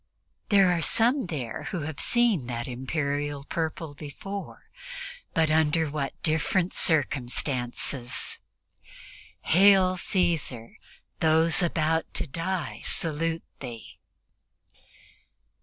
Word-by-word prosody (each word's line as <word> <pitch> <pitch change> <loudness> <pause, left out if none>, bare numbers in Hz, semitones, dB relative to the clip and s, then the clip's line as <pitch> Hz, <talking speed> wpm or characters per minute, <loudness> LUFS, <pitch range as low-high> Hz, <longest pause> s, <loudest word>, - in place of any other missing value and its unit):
There 195 -3 +5
are 170 -1 0
some 240 - +2
there 130 -9 -5
who 180 -5 -3
have 155 0 -5
seen 230 - +2
that 120 -1 -4
Imperial 140 +2 -2
purple 160 0 -3
before, 155 - -8 0.6
but 160 -1 +3
under 160 0 +2
what 140 -2 -4
different 170 +3 +1
circumstances 130 -4 0 1.0
"Hail, 185 +1 +5
Caesar; 165 - -1 0.4
those 160 +2 +4
about 160 -1 0
to - - 0
die 170 +4 -3
salute 165 +1 0 0.2
thee!" 120 -4 -9
160 Hz, 90 wpm, -27 LUFS, 140-175 Hz, 1.0 s, There